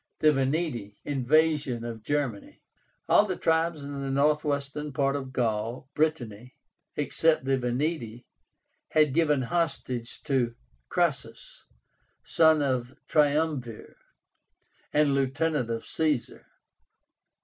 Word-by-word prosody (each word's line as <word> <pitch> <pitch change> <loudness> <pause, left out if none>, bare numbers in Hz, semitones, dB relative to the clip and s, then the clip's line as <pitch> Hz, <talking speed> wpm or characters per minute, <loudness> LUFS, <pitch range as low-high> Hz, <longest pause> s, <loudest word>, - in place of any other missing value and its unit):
THE 155 - +5
VENETI. 135 -7 -1
INVASION 145 -2 +1
OF 115 -2 -6
GERMANY. 135 -4 -3 0.4
All 210 - +5
the 185 - -2
tribes 160 -2 0
in 140 0 -6
the 135 - -3
northwestern 145 +1 0
part 140 +1 +1
of 135 -2 -5
Gaul 120 +2 -2
(Brittany) 125 -7 -2 0.4
except 155 0 +1
the 135 0 +1
VENETI 125 -2 -2 0.6
had 155 -3 +3
given 150 -4 +2
hostages 130 -6 -2
to 125 -5 0 0.3
Crassus, - - -2 0.6
son 160 -2 +4
of 130 -3 0
the 130 - -21
Triumvir, 145 -5 0 1.0
and 150 -1 +3
lieutenant 140 0 0
of 115 0 -3
Caesar. 150 -6 -1
140 Hz, 105 wpm, -27 LUFS, 125-155 Hz, 1.0 s, THE